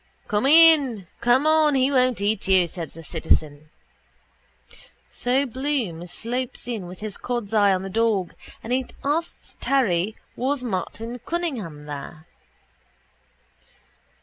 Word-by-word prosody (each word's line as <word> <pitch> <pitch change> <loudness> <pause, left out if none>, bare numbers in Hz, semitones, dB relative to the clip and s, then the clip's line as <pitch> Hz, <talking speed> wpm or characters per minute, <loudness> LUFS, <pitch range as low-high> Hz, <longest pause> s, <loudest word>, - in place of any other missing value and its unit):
—Come 210 +5 +1
in, 290 - +6
come 245 +4 +3
on, 310 -2 +4
he 265 +1 +2
won't 255 -5 +2
eat 205 -1 0
you, 185 -2 +4
says 165 -3 -7
the 165 - -10
citizen. 155 -1 -1 1.4
So 255 +3 0
Bloom 250 - -3
slopes 245 +7 -4
in 220 -7 -4
with 180 +2 -11
his 215 -1 -5
cod's 240 -4 -3
eye 205 -2 +5
on 190 0 0
the 195 - -5
dog 220 -4 +1 0.3
and 235 - -3
he 260 0 0 0.2
asks 315 +4 -3
Terry 215 -7 +1 0.2
was 260 +1 -1
Martin 230 +2 -4
Cunningham 235 - -4
there. 150 +2 -8
230 Hz, 125 wpm, -23 LUFS, 185-265 Hz, 1.4 s, in